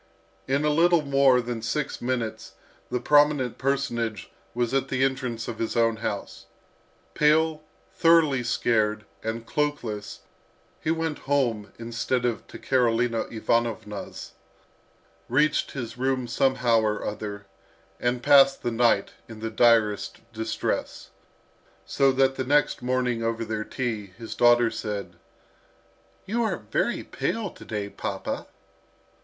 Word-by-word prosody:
In 140 +3 +1
a 150 - +3
little 170 +1 +4
more 135 -2 +4
than 120 -1 -4
six 145 +5 -2
minutes 120 -3 -3 0.4
the 125 - -1
prominent 145 -2 +3
personage 120 -6 -1 0.2
was 120 0 0
at 135 0 +1
the 130 -1 0
entrance 130 -4 -1
of 115 - -6
his 115 - -2
own 115 -1 +3
house. 105 -3 -5 0.7
Pale, 155 +1 +3 0.3
thoroughly 165 -6 +4
scared, 110 -2 +1 0.2
and 115 +1 -4
cloakless, 120 -7 -3 0.6
he - - -3
went 160 -2 -1
home 115 -8 +1
instead 120 +2 -2
of 120 -2 -2
to - - -10
Karolina 120 -2 +1
Ivanovna's, 115 -2 -2 1.0
reached 150 +5 +2
his 120 -3 -6
room 130 -1 0
somehow 125 -2 +2
or 105 -1 -1
other, 105 -1 -5 0.5
and 120 0 -1
passed 135 0 +6
the 120 - 0
night 115 0 +2 0.2
in 110 -1 -9
the 110 0 -4
direst 110 -4 +3
distress; 110 0 -3 0.7
so 135 -1 +3
that 135 0 +2
the 130 - -1
next 145 +1 +2
morning 125 -1 0
over 115 0 -1
their 110 -1 -3
tea, 110 -4 -3
his 115 -1 -7
daughter 120 -1 +4
said, 100 -5 -5 1.1
"You 230 +4 -1
are 225 - 0
very - - -1
pale 220 -4 -3
to - - -14
day, 105 -2 -3
papa." - - -5
120 Hz, 130 wpm, -26 LUFS, 115-135 Hz, 1.1 s, passed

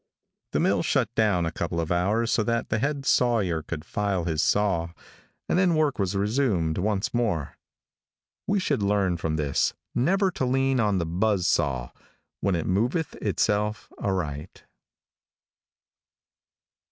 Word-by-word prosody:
The - - +2
mill - - +2
shut - - 0
down 100 -6 +2
a 80 - -2
couple 85 0 -3
of 85 0 -2
hours 105 +7 +1
so - - +2
that 115 0 -1
the 110 - 0
head 140 +2 -2
sawyer 110 -12 +2
could 75 0 -6
file 100 -2 -1
his 80 -3 0
saw, 85 -5 +1 0.5
and - - +2
then 180 -3 +3
work 150 -5 +1
was 100 0 0
resumed 100 - +1
once 100 +1 -1
more. 105 - -1 0.9
We 200 0 +2
should 145 - 0
learn 100 -3 +1
from 80 -1 -2
this 75 -3 0 0.2
never 190 +9 +2
to 155 - -3
lean 135 +1 +1
on 105 -4 +2
the 85 - 0
buzz 95 +3 0
saw 65 -4 0 0.5
when 100 -2 +1
it 80 - -2
moveth 120 - 0
itself 105 0 -1
aright. 80 -7 -3
100 Hz, 145 wpm, -26 LUFS, 85-120 Hz, 0.9 s, then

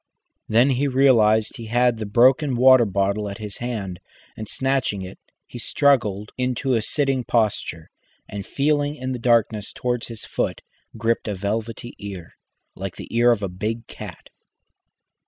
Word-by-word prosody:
Then 120 +5 +4
he 135 +2 +1
realised 115 -5 +3
he 115 -2 -8
had 120 0 +2
the 110 - -4
broken 130 +6 +4
water 130 0 +6
bottle 100 +1 0
at 100 - -7
his 105 -2 -7
hand, 105 -7 -4 0.4
and, 110 -1 -7
snatching 130 -7 -1
it, 95 +1 -10 0.3
he 120 - -9
struggled 110 -6 +1
into 125 +1 0
a 115 - +2
sitting 135 +2 0
posture, 105 -8 -1 0.4
and 100 -1 -6
feeling 145 +4 0
in 130 -2 -4
the 125 - -3
darkness 115 -3 +1
towards 125 -1 -2
his 115 -2 -9
foot, - - -2 0.4
gripped 115 +1 0
a 105 - -2
velvety 110 +4 -4
ear, 95 -4 -8 0.4
like 95 -1 -6
the - - -9
ear 120 +1 +5
of 110 -3 0
a - - 0
big 110 +6 -4
cat. - - -10
115 Hz, 155 wpm, -23 LUFS, 105-125 Hz, 0.4 s, water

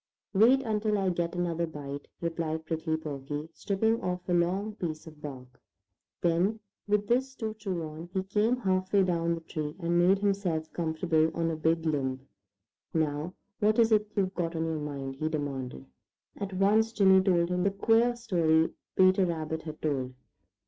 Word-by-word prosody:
"Wait 235 +7 +6
until 215 -2 0
I 195 -1 +1
get 175 -1 -1
another 170 -1 -1
bite," 145 -2 -7
replied 165 -1 -2
Prickly 160 0 -1
Porky, 145 0 -5
stripping 220 +3 0
off 180 0 -3
a 180 - +1
long 185 +5 +1
piece 155 -3 -4
of 155 -2 -13
bark. 130 -4 -9 0.6
Then 180 +6 +2 0.3
with 205 0 +2
this 265 +3 +1
to 220 -4 -3
chew 195 -6 -4
on, 160 +2 -7
he 190 -1 -1
came 210 +5 +1
half 185 -5 0
way 200 -2 +5
down 170 -2 +1
the 165 - -8
tree 155 -2 -5
and 170 0 +1
made 185 +3 +5
himself 195 -6 -1
comfortable 160 -1 +1
on 165 -1 0
a - - -2
big 160 +1 +1
limb. 135 -4 -1 0.7
"Now, 155 +2 -1 0.2
what 215 +1 +3
is 230 -1 +4
it 210 -1 +4
you've 190 -2 +1
got 170 -2 -2
on 160 0 0
your 160 -1 -2
mind?" 140 -2 -5
he 155 +2 -1
demanded. 135 - -4 0.5
At 195 -1 -5
once 210 +4 +3
Jimmy 190 -3 +6
told 175 -3 +2
him 180 0 +1
the 200 - +3
queer 225 +4 +3
story 170 -9 +2 0.2
Peter 185 0 +5
Rabbit 160 -1 -3
had 155 -1 -9
told. 130 -4 -1
170 Hz, 175 wpm, -29 LUFS, 155-200 Hz, 0.7 s, Wait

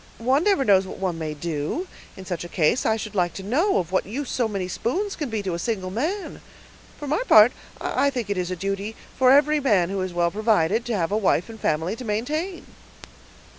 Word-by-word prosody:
One 260 +6 +2
never 390 -9 +2
knows 195 -3 +4
what - - -8
one 180 -3 -2
may 155 -1 -4
do, 160 - -3 0.3
in 190 - -9
such 175 -2 -4
a 175 - -8
case. 170 +9 +1
I 220 - +2
should 215 0 -6
like 175 -3 0
to 195 - -6
know, 300 - +2
of 180 -2 -2
what 185 - 0
use 260 +6 -4
so 240 -3 +1
many 195 -4 -3
spoons 380 - -2
can 295 -5 -4
be 220 -2 -3
to 185 -3 -2
a 170 - -3
single 190 -2 -2
man; 325 - -3 0.6
for 295 - -7
my 310 - 0
part, 215 +3 +8 0.3
I 280 - +1
think 245 -6 -3
it 205 -1 -2
is 180 -1 -2
a 185 - -2
duty 195 +4 -3 0.2
for 255 -1 +4
every 295 +3 +5
man 200 -10 +2
who 195 -1 -2
is 185 -1 -3
well 175 0 +1
provided, 215 0 +1
to 235 -3 -1
have 170 0 -1
a 210 - +2
wife 195 -2 +1
and 225 -1 -10
family 160 +5 0
to 255 - -7
maintain." 300 - -3
210 Hz, 230 wpm, -24 LUFS, 185-260 Hz, 0.6 s, part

